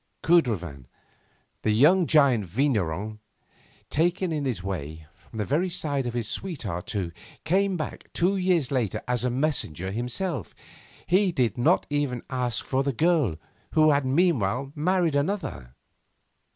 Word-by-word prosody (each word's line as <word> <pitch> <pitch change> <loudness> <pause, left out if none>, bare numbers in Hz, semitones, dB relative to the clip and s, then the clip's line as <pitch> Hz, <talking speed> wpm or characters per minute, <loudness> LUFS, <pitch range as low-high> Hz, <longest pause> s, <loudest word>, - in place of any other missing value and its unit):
Cudrefin, 90 - +1 0.7
the - - 0
young 155 - +5
giant 135 -9 +4
vigneron, 105 - -1 0.7
taken 175 +3 +1
in 150 -3 -2
this 120 -8 -2
way, 80 -5 -5
from - - -15
the 105 - -1
very 165 - +1
side 145 -7 -2
of 120 - -4
his 115 -3 -2
sweetheart 110 - -4
too, 95 -5 -3 0.3
came 190 +3 +1
back 155 - -6
two 185 +4 +1
years 180 -8 +1
later 125 -7 -1
as 125 -1 0
a 125 - +1
messenger 120 - -1
himself. 125 - -3 0.5
He 185 +1 +3
did 125 -9 0
not 120 - +3
even 145 -5 -1
ask 125 -3 -1
for 135 0 0
the 140 0 -1
girl, 155 - +2 0.4
who 155 -1 +5
had 140 -1 +2
meanwhile 135 - +1
married 175 +1 +1
another. 140 - -2
135 Hz, 140 wpm, -26 LUFS, 110-165 Hz, 0.7 s, young